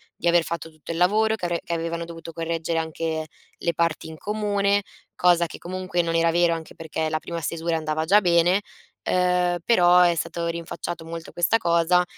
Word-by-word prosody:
di 170 - -3
aver 170 -1 +5
fatto 170 -1 -5
tutto 155 +1 -19
il 165 - -3
lavoro 215 +5 +3
che 180 - -5
avre 175 -1 -1
che 170 - -4
avevano 170 0 -3
dovuto 165 0 -9
correggere 165 0 -2
anche 160 0 -3 0.3
le 170 - -1
parti 170 -1 0
in 160 - -9
comune, 205 0 0 0.3
cosa 175 -1 +4
che - - -10
comunque 185 0 -2
non 165 0 -2
era 165 0 +3
vero, 175 0 +3
anche 160 -1 -8
perché 160 0 -3
la 155 - 0
prima 170 +1 -5
stesura 165 +1 -1
andava 155 0 -2
già 200 +5 +6
bene. 175 +2 +3 0.4
Ehm, 180 -1 +2
però 180 -6 +5
è 175 -1 +4
stato 170 +1 -3
rinfacciato 170 0 -5
molto 165 0 -7
questa 175 +6 +3
cosa, 170 -1 +3
170 Hz, 190 wpm, -24 LUFS, 165-180 Hz, 0.4 s, già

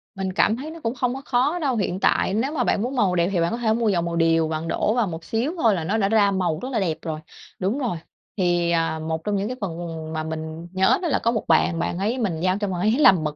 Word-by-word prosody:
Mình 190 -1 -3
cảm 215 +3 +3
thấy 295 +5 -6
nó 330 - -9
cũng 230 +2 -1
không 250 -1 0
có 270 - -6
khó 275 +8 +1
đâu. 275 -6 0
Hiện 190 -4 -1
tại 190 - +2
nếu 235 +7 0
mà 265 -6 0
bạn 205 - +1
muốn 250 +5 -2
màu 195 -7 +2
đẹp 170 0 +2
thì 185 - +1
bạn 170 - +1
có 230 - -2
thể 225 -2 +1
mua 230 -1 +1
dầu 180 -4 +2
màu 170 0 -3
điều, 165 -1 +3
bạn 160 +1 -3
đổ 215 - +1
vào 235 -3 +1
một 165 -2 -6
xíu 235 - -1
thôi 225 -10 +3
là 170 - -3
nó 200 +7 0
đã 195 -3 +1
ra 205 -2 +4
màu 180 -5 0
rất 255 - -4
là 235 - 0
đẹp 165 -5 -1
rồi. 155 -2 -4 0.4
Đúng 200 +9 -1
rồi. 240 -10 -1 0.4
Thì, 175 -2 +2
à, 165 -1 0
một 160 0 -3
trong 210 +1 -1
những 200 +1 -1
cái 250 +2 -5
phần 190 -5 -2 0.4
mà 155 0 -2
mình 160 +1 -6
nhớ 190 0 +3
là 340 -5 +1
có 230 - +3
một 225 -3 -1
bạn, 165 - +3
bạn 170 0 -2
ấy 215 +6 0
mình 195 -10 -1
giao 185 +1 +1
cho 205 - -1
bạn 185 -2 -3
ấy 215 - +3
làm 190 - +6
mực 150 -1 -2
195 Hz, 290 wpm, -23 LUFS, 170-230 Hz, 0.4 s, làm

